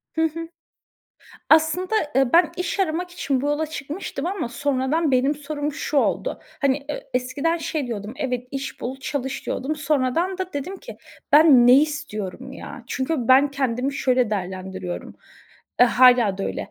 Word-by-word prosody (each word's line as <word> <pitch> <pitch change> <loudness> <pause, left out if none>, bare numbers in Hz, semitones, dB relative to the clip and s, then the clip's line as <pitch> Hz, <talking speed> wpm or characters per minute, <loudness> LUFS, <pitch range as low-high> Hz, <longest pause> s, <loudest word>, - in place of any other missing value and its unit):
Hı 320 - +1
hı. 325 +1 -2 1.0
Aslında, 325 +6 +3 0.2
eee, 270 -2 +3
ben 335 -1 +5
iş 360 +2 -2
aramak 355 0 -1
için 275 -7 -1
bu 285 - -2
yola 295 +2 0
çıkmıştım 300 +1 -5
ama 380 -10 -2
sonradan 285 +4 0
benim 265 +3 +2
sorum 295 0 -4
şu 295 - -3
oldu. - - 0 0.2
Hani, 275 -1 +2
eee, 295 - -6
eskiden 275 +7 0
şey 310 -4 -3
diyordum, 215 -1 -5
"Evet, 250 -2 -3
iş 275 0 -5
bul 255 +2 -4
çalış." 270 -1 -4
diyordum. 290 +4 -2
Sonradan 305 +5 0
da 370 -1 -4
dedim 290 +8 -4
ki: - - -11 0.4
"Ben 290 -5 +7
ne 250 - +8
istiyorum 265 - -5
ya?" 255 -2 -9
Çünkü 260 -1 -2
ben 275 +2 +6
kendimi 265 -1 -1
şöyle 255 -4 +1
değerlendiriyorum. 185 -2 -5 0.7
Eee, 245 - +9
hâlâ 245 -5 +5
da - - -2
öyle. - - -4
275 Hz, 160 wpm, -23 LUFS, 250-315 Hz, 1.0 s, Eee